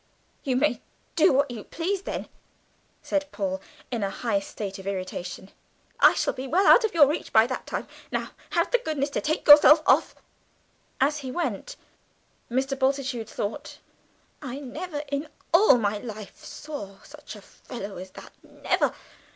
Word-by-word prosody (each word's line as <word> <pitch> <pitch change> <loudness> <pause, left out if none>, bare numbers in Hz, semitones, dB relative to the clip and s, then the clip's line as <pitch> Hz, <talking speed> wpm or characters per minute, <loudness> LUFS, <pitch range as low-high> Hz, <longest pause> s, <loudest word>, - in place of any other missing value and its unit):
"You 265 -4 0
may 255 -2 +1 0.3
do 315 - +5
what 275 0 +2
you 225 -4 -7
please 370 +3 -3
then," - - -5 0.8
said 290 -1 -2
Paul, 190 -2 -3 0.3
in 235 -3 -2
a 200 - 0
high 205 +1 -1
state 195 0 -7
of 190 - -9
irritation, 185 -1 -5 0.5
"I - - +7
shall - - 0
be 260 +1 -6
well 370 +8 +2
out - - +7
of 435 -5 -1
your 305 -3 +8
reach 295 +4 -3
by 220 0 +6
that 260 +2 -5
time. - - -4 0.2
Now - - -3 0.2
have 345 -4 0
the - - +4
goodness 300 - -2
to - - -1
take 310 +1 -2
yourself 295 +1 +9
off." - - +3 0.8
As 290 +3 +2
he 265 -2 -6
went, 355 - -3 0.7
Mr. 265 +3 0
Bultitude 265 -4 -1
thought, 205 0 -5 0.6
"I 265 -1 -6
never 290 +3 -6
in 285 +2 -2 0.2
all 340 -6 +7
my 210 -2 -1
life 215 -3 -9
saw 210 -11 -8
such 295 -5 -11
a 210 - -12
fellow 205 -4 -9
as 185 +1 -8
that, - - -13
never! - - -1
265 Hz, 165 wpm, -26 LUFS, 210-300 Hz, 0.8 s, yourself